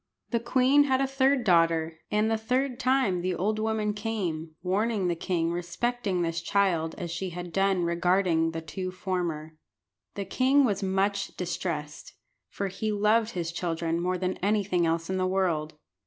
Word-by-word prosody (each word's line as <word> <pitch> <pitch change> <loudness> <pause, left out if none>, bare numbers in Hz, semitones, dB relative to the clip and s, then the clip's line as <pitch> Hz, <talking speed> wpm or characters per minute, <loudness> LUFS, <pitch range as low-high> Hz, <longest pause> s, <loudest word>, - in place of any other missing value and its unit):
The 235 - +2
queen 260 +4 +4
had 260 -2 +2
a 270 - +2
third 270 -1 +2
daughter, 165 -4 +2
and 210 +1 +2
the - - +3
third 250 +3 -1
time 255 -9 +2
the 180 0 -1
old 215 +5 0
woman 215 -1 0
came, 180 -8 -3
warning 200 +1 0
the 175 - 0
king 165 -1 -1
respecting 180 +2 -1
this 165 0 -2
child 170 -4 +1
as 175 -4 -5
she 180 +2 -3
had 175 0 -7
done 195 -2 +2
regarding 170 -1 +2
the 165 0 -5
two 185 +4 -5
former. 170 -4 -3 0.6
The 200 - -3
king 265 +7 +3
was 205 -4 0
much 195 +1 -1
distressed, 165 -4 -4 0.4
for 200 - -3
he 215 +3 -3
loved 215 +2 +2
his 170 -2 -3
children 165 -1 -2
more 180 +1 0
than 185 +1 -2
anything 195 -3 +1
else 165 0 -1
in 190 - -1
the 185 0 +1
world. 170 -5 0
185 Hz, 170 wpm, -27 LUFS, 170-215 Hz, 0.6 s, queen